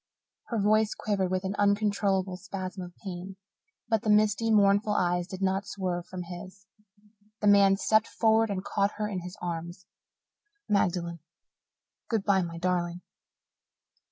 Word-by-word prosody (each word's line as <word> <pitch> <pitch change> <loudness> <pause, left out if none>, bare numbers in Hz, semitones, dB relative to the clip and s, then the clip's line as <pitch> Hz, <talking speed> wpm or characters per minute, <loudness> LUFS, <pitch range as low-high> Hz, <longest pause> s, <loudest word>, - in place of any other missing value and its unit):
Her 230 - -2
voice 215 +1 +3
quivered 195 -3 -1
with 185 +1 -1
an 190 +1 -2
uncontrollable 200 -2 +1
spasm 185 0 -6
of 180 -1 -9
pain, 190 0 -6 0.5
but 225 -3 +1
the 215 - -2
misty, 210 +1 +3
mournful 205 0 +4
eyes 175 -2 +1
did 190 0 -6
not 195 +1 0
swerve 180 -3 -3
from 185 -1 -6
his. 185 +2 -10 0.7
The - - -2
man 200 -1 +6
stepped 215 +2 +2
forward 225 0 +2
and 190 -1 -3
caught 200 0 0
her 210 0 -2
in 195 -3 -3
his 180 +1 -9
arms. 175 +1 -5 0.8
"Magdalen, 175 -4 0 0.9
good 225 -4 0
bye, 195 -2 +3
my 170 -1 -5
darling. 175 0 -1
195 Hz, 145 wpm, -28 LUFS, 180-205 Hz, 0.9 s, man